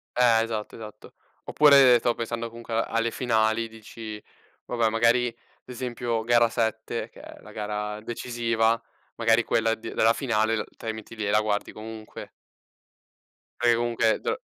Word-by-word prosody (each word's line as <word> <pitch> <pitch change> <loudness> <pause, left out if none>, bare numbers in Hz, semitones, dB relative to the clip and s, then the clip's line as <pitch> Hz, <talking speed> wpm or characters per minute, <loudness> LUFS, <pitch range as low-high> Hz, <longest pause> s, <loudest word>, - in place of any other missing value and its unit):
Eh, 115 -2 +4
esatto, 110 -2 -4
esatto. 110 -1 -11 0.3
Oppure 140 -5 +6
stavo 120 0 0
pensando 115 0 -4
comunque 115 0 -8
alle 115 +1 0
finali, 115 -2 +1
dici: 110 -1 -9 0.4
"Vabbè, 115 -2 +1
magari, 115 +2 +3
ad 115 - -8 0.3
esempio 120 -2 -3
gara 120 0 +4
7, 110 0 -2
che - - -17
è - - -12
la - - -14
gara 105 0 -4
decisiva, 115 -1 0 0.4
magari 115 0 +3
quella 115 -1 +1
d 110 - -8
della 115 +1 +4
finale, 115 -4 0
uhm, 105 - -2
te - - -11
la 110 - -1
metti 110 +1 -10
lì 110 - -3
e 100 - 0
la 105 - +4
guardi 105 -1 -2
comunque". 110 0 -9 1.3
Perché 120 0 +4
comunque 115 -1 +1
d - - -16
eh, - - 0
115 Hz, 160 wpm, -26 LUFS, 110-120 Hz, 1.3 s, Oppure